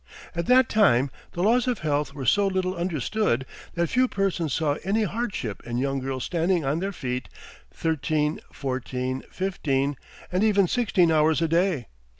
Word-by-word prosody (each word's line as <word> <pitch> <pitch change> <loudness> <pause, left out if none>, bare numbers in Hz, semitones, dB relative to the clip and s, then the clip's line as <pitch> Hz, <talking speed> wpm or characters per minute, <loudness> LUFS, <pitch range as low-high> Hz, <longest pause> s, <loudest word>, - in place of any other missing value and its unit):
At 170 0 -3
that 255 -1 +6
time 140 - +3 0.2
the 175 - -2
laws 240 +5 +3
of 245 -2 +1
health 145 -1 0
were 135 -3 -5
so 200 +10 +4
little 185 -1 0
understood 170 - 0 0.3
that 170 0 +2
few 255 +1 +3
persons 190 - -1
saw 150 +1 +1
any 205 +4 +1
hardship 200 - -3
in 120 0 -4
young 135 +1 0
girls 130 -1 -3
standing 170 -1 0
on 145 +4 0
their 195 +2 -2
feet 125 -8 -4 0.4
thirteen, 150 - -1
fourteen, 130 -1 -3
fifteen, 145 -7 -1 0.4
and 180 +3 +1
even 200 -3 +4
sixteen 190 -7 +2
hours 155 0 +3
a 165 - +1
day! 165 -5 +1
165 Hz, 160 wpm, -25 LUFS, 135-195 Hz, 0.4 s, that